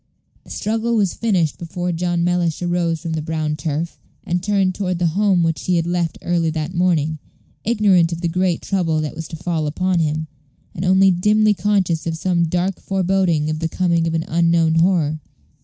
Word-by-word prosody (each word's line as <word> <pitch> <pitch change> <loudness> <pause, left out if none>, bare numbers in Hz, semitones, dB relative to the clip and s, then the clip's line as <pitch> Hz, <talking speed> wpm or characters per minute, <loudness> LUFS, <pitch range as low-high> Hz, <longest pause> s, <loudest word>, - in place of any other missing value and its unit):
The - - -18
struggle 225 +2 -1
was 200 -5 +1
finished 185 -9 0
before 175 +1 -3
John 175 0 -1
Mellish 175 -1 0
arose 175 -2 0
from 165 -2 -4
the 160 - -2
brown 155 -1 -2
turf, 155 +2 -4 0.2
and 175 +1 -1
turned 195 -1 +1
toward 185 -2 -2
the 170 -2 0
home 195 -3 +2
which 165 -1 -1
he 180 - +2
had 165 -1 +1
left 175 -2 -1
early 170 -2 +1
that 160 +2 -3
morning, 160 -4 +1 0.4
ignorant 200 -7 +3
of 170 0 -4
the 175 - 0
great 180 0 0
trouble 170 -5 0
that 155 - -4
was 160 -1 -6
to 160 - -7
fall 160 -2 -2
upon 180 +4 0
him, 155 0 -1 0.5
and 175 - -5
only 190 +1 +5
dimly 210 +4 +3
conscious 185 -5 0
of 165 -1 -2
some 175 0 +1
dark 180 +3 -1
foreboding 185 -5 +1
of 155 - -3
the 165 0 -2
coming 170 -2 +1
of 165 - -1
an 160 - -1
unknown 165 -1 +2
horror. 165 -4 +2
175 Hz, 190 wpm, -20 LUFS, 160-185 Hz, 0.5 s, only